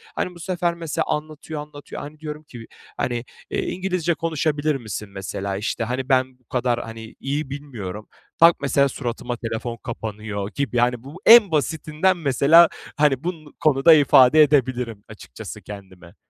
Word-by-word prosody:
Hani, 180 -1 -3
bu - - -13
sefer 175 -1 -1
mesela 165 -3 -3
anlatıyor 155 0 -4
anlatıyor. 145 -1 -9
Hani, 150 +1 -10
diyorum 155 0 -7
ki, 120 -5 -11 0.3
hani, 120 0 -2 0.3
"Eee, - - -1
İngilizce 180 -2 -1
konuşabilir 155 -2 -1
misin?" 105 -4 -6
mesela, 95 0 -4
işte, 110 +2 -2
"Hani, 130 +4 -3
ben 130 -1 +1
bu 125 - -36
kadar, 120 -1 -1
hani, 115 0 -10
iyi 140 +1 -3
bilmiyorum." 110 -8 -7 0.3
Tak, 165 +1 +7
mesela 140 0 +3
suratıma 120 -1 -4
telefon 115 +1 -4
kapanıyor 105 -3 -5
gibi. 140 -4 -2
Yani, 120 0 +1
bu 155 +8 -11
en 225 -5 +8
basitinden 155 +4 0
mesela, 155 +3 +5 0.3
hani, 145 -2 +2
bun 160 -4 -6
konuda 150 +2 +5
ifade 145 0 +6
edebilirim 125 -7 0
açıkçası - - -10
kendimi. 95 -4 -12
140 Hz, 150 wpm, -22 LUFS, 115-155 Hz, 0.3 s, en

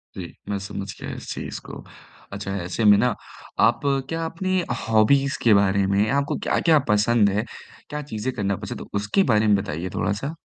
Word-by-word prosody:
जी, 90 -3 -7 0.2
मैं 100 - -1
समझ 100 0 -5
गया - - -5
इस - - -6
चीज़ - - -6
को। - - -9 0.5
अच्छा 100 0 -4
ऐसे 90 +6 -3
में 105 -1 +8
ना 125 0 +2 0.5
आप - - 0 0.3
क्या 165 0 -2
अपनी 185 +3 -1 0.3
हॉबीज़ 135 +6 +3
के 115 -3 +6
बारे 100 -1 +3
में, 100 +2 +2
आपको 140 +1 0
क्या-क्या 160 -3 +4
पसंद 105 0 +4
है? 105 +3 0 0.5
क्या 150 0 -4
चीज़ें 110 +4 -3
करना 100 -3 0
पसंद - - -6
है? - - -7
उसके 105 - +2
बारे 105 0 +3
में 105 - +5
बताइए 95 -3 -3
थोड़ा-सा। 140 +10 -2
105 Hz, 185 wpm, -23 LUFS, 100-140 Hz, 0.5 s, में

